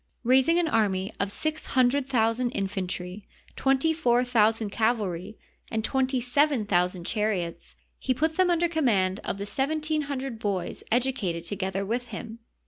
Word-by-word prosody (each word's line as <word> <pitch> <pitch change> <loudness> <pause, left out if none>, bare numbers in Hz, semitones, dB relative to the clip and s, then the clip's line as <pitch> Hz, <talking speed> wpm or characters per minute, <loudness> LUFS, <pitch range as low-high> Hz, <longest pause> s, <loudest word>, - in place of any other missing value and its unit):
Rais 255 +2 +4
ing 335 +1 +4
an 345 -2 +2
army 200 -7 +1
of 200 0 0
six 310 +6 -3
hundred 260 +2 +3
thousand 235 0 +2
infantry, 190 0 -4 0.3
twenty 270 +4 +2
four 250 -6 +2
thousand 225 -3 +2
cavalry, 210 -4 -1 0.3
and 220 -1 -2
twenty 265 +1 +1
seven 255 -1 +2
thousand 180 -2 +1
char 215 +1 0
iots, 175 -5 -4 0.2
he 260 - -1
put 315 +5 +1
them 370 0 +3
under 345 0 +3
command 215 - +1
of - - -3
the 200 - -4
seventeen 310 +6 -1
hundred 265 -4 -4
boys 195 -5 -3
educated 235 -9 0
together 190 +1 -3
with 240 +4 -2
him. 230 0 -7
230 Hz, 155 wpm, -27 LUFS, 200-270 Hz, 0.3 s, Rais